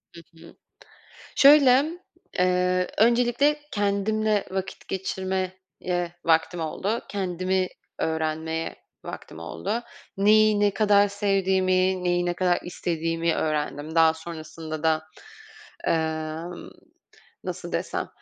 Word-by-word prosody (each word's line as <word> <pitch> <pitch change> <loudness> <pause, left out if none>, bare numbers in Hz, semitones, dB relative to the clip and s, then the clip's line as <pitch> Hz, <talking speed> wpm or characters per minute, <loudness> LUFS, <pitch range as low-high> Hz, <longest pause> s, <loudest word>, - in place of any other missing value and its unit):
Hı 170 - -10 0.3
hı, - - -16 0.8
şöyle, 275 -2 +7 0.5
eee, 180 0 +2
öncelikle 240 +6 +3
kendimle 205 +1 +1
vakit 190 0 -5
geçirmeye 190 0 -2 0.7
vaktim 165 +1 +2
oldu. 195 +8 -2
Kendimi 185 -1 -1 0.3
öğrenmeye 160 0 -2 0.3
vaktim - - -8
oldu. 200 - -3 0.3
Neyi 215 +1 +5
ne 205 0 +4
kadar 205 -1 +4
sevdiğimi, 190 -2 +1
neyi 175 0 +1
ne 175 - 0
kadar 180 -1 +2
istediğimi 165 -1 -1
öğrendim. 150 0 -2
Daha 160 -1 +5
sonrasında 160 -1 -7
da, 160 -1 +2 0.9
eee, 160 +1 -2 0.7
nasıl - - -6
desem, - - -2
185 Hz, 95 wpm, -25 LUFS, 160-205 Hz, 0.9 s, şöyle